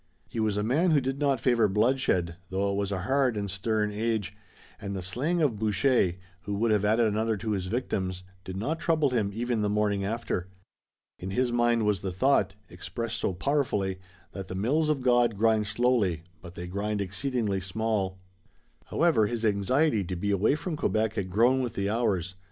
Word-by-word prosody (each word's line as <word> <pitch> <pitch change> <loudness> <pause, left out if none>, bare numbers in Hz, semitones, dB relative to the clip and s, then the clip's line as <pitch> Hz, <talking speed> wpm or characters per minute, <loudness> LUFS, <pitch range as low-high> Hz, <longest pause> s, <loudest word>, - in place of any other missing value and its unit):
He 115 - -5
was 110 -2 +1
a 105 - 0
man 145 - +2
who 155 -3 +4
did 135 +1 -3
not 140 -3 +2
favor 115 -2 +3
bloodshed, 105 -5 +1
though 100 +1 0
it - - -2
was 100 0 -1
a 95 -2 -2
hard 130 0 +1
and 100 -2 -3
stern 105 +2 0
age, 105 -2 -2 0.4
and 100 0 -5
the 95 - -4
slaying 145 - 0
of 120 -8 +1
Boucher, 110 -2 +2 0.3
who 100 +2 -4
would 110 +2 +1
have 105 -2 +2
added 110 +3 +3
another 110 +1 0
to 110 +2 -3
his 95 -3 -2
victims, 95 -5 -2 0.2
did 95 0 -6
not 150 +11 -2
trouble 155 -5 +2
him 110 -5 +1
even 115 +1 -1
the 105 - +1
morning 105 -1 +1
after. 100 -3 -2 0.7
In 95 - -5
his 125 +5 0
mind 120 -2 +2
was 105 -3 +1
the 95 - -3
thought, 125 +1 +2
expressed 115 +6 -5
so 95 - -1
powerfully, 100 -6 0 0.3
that 95 -1 -7
the 90 - -6
mills 145 +11 +1
of 150 -3 +1
God 120 -3 +3
grind 110 -1 +2
slowly, 110 -7 +1 0.2
but 85 0 -11
they 90 - -6
grind 100 +3 -2
exceeding 100 0 -1
small. 95 0 -1 0.7
However, 145 -11 +2
his 115 0 -2
anxiety 110 +4 +2
to 90 - -4
be 100 +4 -1
away 100 +7 +3
from 165 +1 -4
Quebec 110 -4 0
had 95 -3 -3
grown 120 +7 +3
with 125 -3 -3
the 100 +1 -1
hours. 95 -6 0
110 Hz, 190 wpm, -28 LUFS, 100-120 Hz, 0.7 s, who